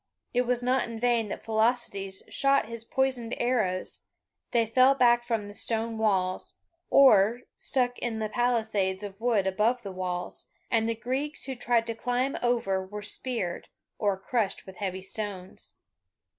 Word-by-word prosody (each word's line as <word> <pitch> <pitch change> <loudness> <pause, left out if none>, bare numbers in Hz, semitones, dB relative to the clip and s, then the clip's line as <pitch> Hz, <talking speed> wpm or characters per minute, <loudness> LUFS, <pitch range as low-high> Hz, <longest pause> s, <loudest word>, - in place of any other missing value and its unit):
It 245 0 +1
was 245 0 +1
in 245 -2 0
vain 235 -2 +2
that - - -6
Philoctetes 220 -4 0
shot 275 -3 +2
his 230 0 -6
poisoned 255 -1 -1
arrows, 215 -7 -1 0.4
they 235 -1 +2
fell 255 +4 +5
back 240 -2 +4
from 225 -4 -2
the 205 - -8
stone 225 +1 -2
walls, 190 -4 0 0.3
or 235 -3 +6
stuck 245 -2 0
in 230 -2 -2
the 220 -1 -1
palisades 215 -5 0
of 200 +1 -8
wood 230 -5 +2
above 215 +6 +1
the 200 - -5
walls, 180 -1 -4 0.2
and 225 0 +2
the 230 - 0
Greeks 260 +7 -3
who 265 - -3
tried 240 -1 +1
to 230 - -2
climb 245 +4 -1
over 230 -6 +1
were 205 +2 -7
speared, 215 -5 -3 0.3
or 200 -3 +1
crushed 205 +1 -1
with 190 -1 -11
heavy 190 -2 -3
stones. 190 -2 -6
225 Hz, 155 wpm, -28 LUFS, 200-245 Hz, 0.4 s, or